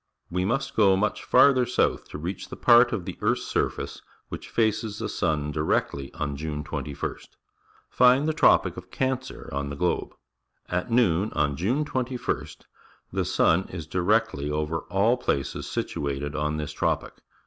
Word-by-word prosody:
We 90 Hz, +1 st, 0 dB
must 135 Hz, +7 st, -1 dB
go 100 Hz, -3 st, +5 dB
much 105 Hz, +2 st, -1 dB
farther 130 Hz, -3 st, +5 dB
south 125 Hz, -, 0 dB
to -, -, -6 dB
reach 90 Hz, +5 st, -5 dB
the -, -, -7 dB
part 120 Hz, 0 st, +6 dB
of 95 Hz, -5 st, -3 dB
the 95 Hz, -, -7 dB
earth's -, -, +1 dB
surface -, -, -2 dB, 0.3 s
which -, -, -7 dB
faces 110 Hz, -2 st, 0 dB
the -, -, -3 dB
sun 75 Hz, -1 st, -1 dB
directly 70 Hz, -2 st, -1 dB
on 70 Hz, 0 st, -3 dB
June 75 Hz, 0 st, -4 dB
21st. 70 Hz, 0 st, -5 dB, 0.6 s
Find 130 Hz, +4 st, +4 dB
the 155 Hz, -, +1 dB
Tropic -, -, +4 dB
of -, -, -9 dB
Cancer 130 Hz, -1 st, -3 dB
on 70 Hz, 0 st, -2 dB
the 70 Hz, -, -5 dB
globe. 90 Hz, +5 st, -1 dB, 0.5 s
At 90 Hz, +5 st, -2 dB
noon 110 Hz, -5 st, +2 dB
on 70 Hz, -1 st, +1 dB
June 120 Hz, -, 0 dB
21st 130 Hz, -3 st, -3 dB
th -, -, -27 dB, 0.5 s
e -, -, +1 dB
sun 90 Hz, +4 st, +2 dB
Js,_directly 90 Hz, -1 st, 0 dB
over 75 Hz, +2 st, -1 dB
.all, 105 Hz, +5 st, +3 dB
places 70 Hz, -, -2 dB
situated 70 Hz, +1 st, -3 dB
o 75 Hz, 0 st, 0 dB
n 75 Hz, +1 st, -2 dB
this 75 Hz, -1 st, -4 dB
tropic. -, -, -1 dB
90 Hz, 160 wpm, -26 LUFS, 75-120 Hz, 0.6 s, part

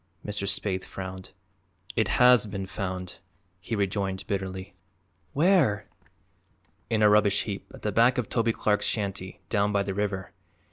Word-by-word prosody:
Mr. 105 Hz, -1 st, -2 dB
Spaythe 95 Hz, -1 st, -1 dB
frowned. 95 Hz, 0 st, -7 dB, 0.7 s
"It 110 Hz, -, +2 dB
has 125 Hz, -3 st, +6 dB
been 95 Hz, -1 st, -4 dB
found," 95 Hz, -2 st, -5 dB, 0.4 s
he 105 Hz, +6 st, -4 dB
rejoined 100 Hz, -1 st, -1 dB
bitterly. 95 Hz, -1 st, -4 dB, 0.6 s
"Where?" 145 Hz, -, +3 dB, 1.0 s
"In 110 Hz, -1 st, +2 dB
a -, -, +8 dB
rubbish 105 Hz, -1 st, +4 dB
heap 100 Hz, -2 st, -6 dB
at -, -, -13 dB
the 105 Hz, -, 0 dB
back 120 Hz, +5 st, +4 dB
of 120 Hz, -4 st, -1 dB
Toby 115 Hz, -1 st, +1 dB
Clark's 105 Hz, -2 st, +1 dB
shanty, 100 Hz, -3 st, -3 dB
down 105 Hz, -1 st, +2 dB
by 100 Hz, -1 st, +2 dB
the 100 Hz, -1 st, -3 dB
river. 100 Hz, -1 st, -2 dB
100 Hz, 145 wpm, -27 LUFS, 95-110 Hz, 1.0 s, a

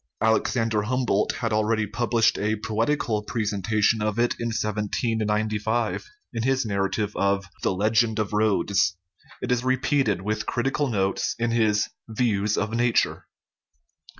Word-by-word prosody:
Alexander 110 Hz, 0 st, +1 dB
Humboldt 115 Hz, -2 st, 0 dB
had 115 Hz, -3 st, -2 dB
already 110 Hz, 0 st, +1 dB
published 115 Hz, +2 st, +1 dB
a 105 Hz, +2 st, 0 dB
poetical 110 Hz, +1 st, -1 dB
presentation 105 Hz, 0 st, 0 dB
of 105 Hz, +1 st, -1 dB
it 120 Hz, +1 st, +2 dB
in 120 Hz, -, -2 dB
1795, 110 Hz, 0 st, -1 dB, 0.2 s
in 115 Hz, -, -2 dB
his 130 Hz, +1 st, +1 dB
narrative 100 Hz, +1 st, -1 dB
of 100 Hz, 0 st, +1 dB, 0.2 s
the -, -, +1 dB
Legend 110 Hz, +3 st, +2 dB
of 105 Hz, -1 st, -2 dB
Rhodes; 100 Hz, -2 st, +2 dB, 0.5 s
it -, -, -1 dB
is 125 Hz, 0 st, +1 dB
repeated, 130 Hz, -6 st, +1 dB
with 105 Hz, +1 st, -2 dB
critical 135 Hz, +4 st, 0 dB
notes, 100 Hz, -5 st, 0 dB
in 120 Hz, 0 st, 0 dB
his 110 Hz, -3 st, +2 dB, 0.2 s
Views 105 Hz, -3 st, 0 dB
of 105 Hz, +2 st, -1 dB
Nature. 120 Hz, 0 st, +1 dB
110 Hz, 130 wpm, -25 LUFS, 105-115 Hz, 0.5 s, it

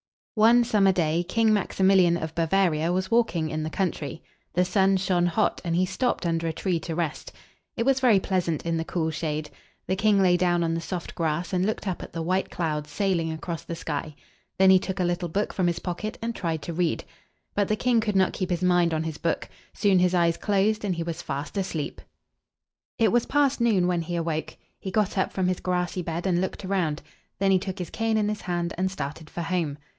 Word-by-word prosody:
One 235 Hz, +2 st, +5 dB
summer 205 Hz, -4 st, +3 dB
day 170 Hz, -2 st, +1 dB
King 225 Hz, +2 st, +3 dB
Max 205 Hz, -2 st, -1 dB
i -, -, +3 dB
mil´ian 185 Hz, -3 st, +5 dB
of 160 Hz, 0 st, -5 dB
Ba 165 Hz, 0 st, 0 dB
va´ri 175 Hz, -4 st, +2 dB
a 170 Hz, -, +1 dB
was 185 Hz, +3 st, -1 dB
walking 175 Hz, -9 st, +2 dB
in 155 Hz, 0 st, -2 dB
the 155 Hz, -, -3 dB
country. 160 Hz, -4 st, -3 dB, 0.3 s
The 180 Hz, +1 st, +2 dB
sun 195 Hz, 0 st, +3 dB
shone 180 Hz, -2 st, +1 dB
hot, 175 Hz, +5 st, 0 dB
and 170 Hz, -2 st, -1 dB
he 185 Hz, +2 st, +3 dB
stopped 220 Hz, +2 st, -1 dB
under 165 Hz, 0 st, 0 dB
a 160 Hz, -, -1 dB
tree 180 Hz, 0 st, -1 dB
to 160 Hz, 0 st, -5 dB
rest. 165 Hz, -3 st, -3 dB, 0.5 s
It 230 Hz, -, 0 dB
was 270 Hz, 0 st, +3 dB
very 240 Hz, -6 st, +5 dB
pleasant 180 Hz, -5 st, -1 dB
in 165 Hz, -1 st, 0 dB
the 165 Hz, -, -2 dB
cool 160 Hz, -1 st, -1 dB
shade. 155 Hz, -1 st, -3 dB, 0.3 s
The 190 Hz, -, 0 dB
king 205 Hz, +1 st, +3 dB
lay 180 Hz, -2 st, +4 dB
down 175 Hz, -1 st, +2 dB
on 165 Hz, 0 st, 0 dB
the 165 Hz, -, -2 dB
soft 175 Hz, 0 st, -5 dB
grass, 165 Hz, +2 st, -2 dB
and 180 Hz, 0 st, +2 dB
looked 215 Hz, 0 st, -2 dB
up 185 Hz, -, -2 dB
at -, -, -9 dB
the 165 Hz, -, -3 dB
white 185 Hz, +3 st, 0 dB
clouds 150 Hz, -4 st, -2 dB
sailing 170 Hz, -1 st, 0 dB
across 160 Hz, +1 st, -5 dB
the 170 Hz, -, -5 dB
sky. 155 Hz, -2 st, -4 dB, 0.4 s
Then 190 Hz, 0 st, +6 dB
he 190 Hz, -, +7 dB
took 190 Hz, 0 st, -4 dB
a -, -, +2 dB
little 175 Hz, 0 st, -1 dB
book 200 Hz, +6 st, -1 dB
from 185 Hz, -2 st, +1 dB
his 170 Hz, -1 st, 0 dB
pocket 195 Hz, +5 st, -4 dB
and 230 Hz, +1 st, -3 dB
tried 165 Hz, -7 st, -3 dB
to 170 Hz, -, -4 dB
read. 170 Hz, 0 st, 0 dB, 0.5 s
But 205 Hz, -1 st, +1 dB
the 215 Hz, -, +1 dB
king 240 Hz, +2 st, +2 dB
could 210 Hz, -2 st, -1 dB
not 190 Hz, -1 st, +3 dB
keep 185 Hz, -, -3 dB
his 175 Hz, 0 st, -1 dB
mind 175 Hz, -2 st, +3 dB
on 155 Hz, -, -1 dB
his 160 Hz, -2 st, -5 dB
book. 165 Hz, -, -1 dB, 0.3 s
Soon 200 Hz, -3 st, +3 dB
his 180 Hz, 0 st, +3 dB
eyes 170 Hz, -1 st, +3 dB
closed, 210 Hz, +1 st, +1 dB
and 195 Hz, -3 st, 0 dB
he 170 Hz, -, -2 dB
was 170 Hz, 0 st, -4 dB
fast 140 Hz, 0 st, -5 dB
asleep. 175 Hz, -6 st, -3 dB, 1.0 s
It 225 Hz, -4 st, +3 dB
was 240 Hz, -1 st, +2 dB
past 285 Hz, -3 st, +2 dB
noon 210 Hz, -6 st, +3 dB
when 175 Hz, -1 st, +1 dB
he 175 Hz, +1 st, -4 dB
awoke. 165 Hz, -2 st, -3 dB, 0.2 s
He 190 Hz, -, -5 dB
got 205 Hz, 0 st, 0 dB
up 190 Hz, -, 0 dB
from 185 Hz, -1 st, 0 dB
his 185 Hz, -1 st, 0 dB
grassy 180 Hz, 0 st, -1 dB
bed, 170 Hz, +1 st, -4 dB
and 180 Hz, -2 st, +2 dB
looked 190 Hz, +1 st, -4 dB
around. 175 Hz, -5 st, -1 dB, 0.3 s
Then 195 Hz, 0 st, +2 dB
he 190 Hz, -, +4 dB
took 190 Hz, +1 st, -5 dB
his 180 Hz, -4 st, -5 dB
cane 225 Hz, -1 st, 0 dB
in 210 Hz, -1 st, +1 dB
his 210 Hz, 0 st, -3 dB
hand, 175 Hz, -1 st, -2 dB
and 190 Hz, 0 st, +1 dB
started 155 Hz, -3 st, -6 dB
for 175 Hz, -, -5 dB
home. 165 Hz, -4 st, -1 dB
180 Hz, 235 wpm, -26 LUFS, 165-195 Hz, 1.0 s, he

